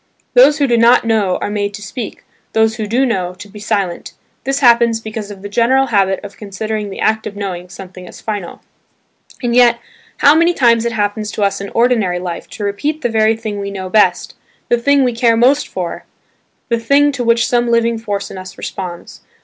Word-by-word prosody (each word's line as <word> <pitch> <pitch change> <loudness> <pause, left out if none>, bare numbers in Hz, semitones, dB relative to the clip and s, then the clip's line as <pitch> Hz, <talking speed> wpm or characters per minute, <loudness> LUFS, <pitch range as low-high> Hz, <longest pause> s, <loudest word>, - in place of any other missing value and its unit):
Those 405 -12 +6
who 290 - +2
do 240 -3 +2
not 235 +1 +5
know 210 -5 +1
are - - -2
made 205 -1 -2
to 205 - -10
speak, 220 +1 -7 0.3
those 220 0 +2
who 215 -2 -3
do 245 +5 +1
know 185 -7 -2
to 205 +3 -11
be 210 +1 -12
silent. 200 -4 -2 0.3
This 270 0 0
happens 235 -2 +4
because 215 -1 -6
of 200 -1 -10
the - - -4
general 240 +6 +2
habit 195 -2 +2
of 205 -1 -10
considering 210 +1 -4
the 195 - -8
act 220 0 0
of 205 - -8
knowing 180 -3 -5
something 185 0 -11
as - - -12
final. 205 -5 -6 0.8
And 240 -1 0
yet 240 -1 +5 0.4
how 285 - +6
many 335 +2 +3
times 235 -4 +3
it 235 - 0
happens 210 0 -2
to 210 - -2
us 200 0 0
in 200 - -6
ordinary 230 -7 +2
life 180 -1 -6
to 210 - -7
repeat 285 +10 -2
the 240 - +1
very 220 0 +2
thing 215 -2 -5
we 200 0 -4
know 190 -2 -6
best, 215 +1 +2 0.4
the 240 - +3
thing 280 +3 +3
we 250 -1 +1
care 230 -1 +2
most 270 +5 +3
for, 180 -2 -5 0.6
the 235 -1 +1
thing 285 +5 +3
to 255 -3 -3
which 230 0 +2
some 240 -1 +1
living 230 -1 +1
force 205 -3 -4
in 190 - -7
us 185 0 -10
responds. 180 -3 -7
220 Hz, 210 wpm, -16 LUFS, 200-235 Hz, 0.8 s, Those